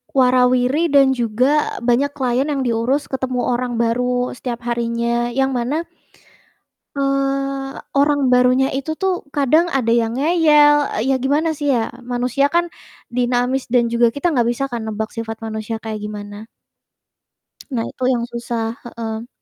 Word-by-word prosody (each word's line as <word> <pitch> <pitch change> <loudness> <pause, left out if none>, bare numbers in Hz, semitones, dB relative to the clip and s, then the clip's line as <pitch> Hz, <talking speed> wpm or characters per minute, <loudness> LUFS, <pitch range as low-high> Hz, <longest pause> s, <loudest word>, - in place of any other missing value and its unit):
wara-wiri 255 +4 +3
dan 275 -2 +5
juga 255 +4 +1
banyak 255 +4 +2
klien 260 0 0
yang 280 -3 -1
diurus 245 +4 0
ketemu 255 -2 -2
orang 245 0 -1
baru 245 +2 0
setiap 240 -1 -5
harinya, 235 0 -1
yang 270 +2 +1
mana 275 +8 -1 1.1
eee, 275 0 -1 0.2
orang 280 -2 +2
barunya 250 +1 +4
itu 275 +4 -3
tuh 380 0 -1 0.2
kadang 305 +5 +3
ada 255 -7 0
yang 230 0 +1
ngeyel, 300 -1 +5 0.2
e - - -2
ya - - +4
gimana 295 +5 +1
sih 295 -1 -3
ya, 225 -2 -1
manusia 250 +3 0
kan, 345 +3 +2 0.5
dinamis 250 +1 0
dan 235 -1 +2
juga 235 0 +4
kita 285 +8 -1
gak 240 -5 +2
bisa 240 +3 -1
kan 235 - -2
nebak 220 0 -4
sifat 225 -1 -5
manusia 220 0 -4
kayak 215 -1 -4
gimana? 205 0 -7 1.3
Nah, 230 -2 0
itu 255 - -12
yang 235 -2 -1
susah, 235 -1 -3
heeh. 230 -1 -6
250 Hz, 145 wpm, -19 LUFS, 235-275 Hz, 1.3 s, dan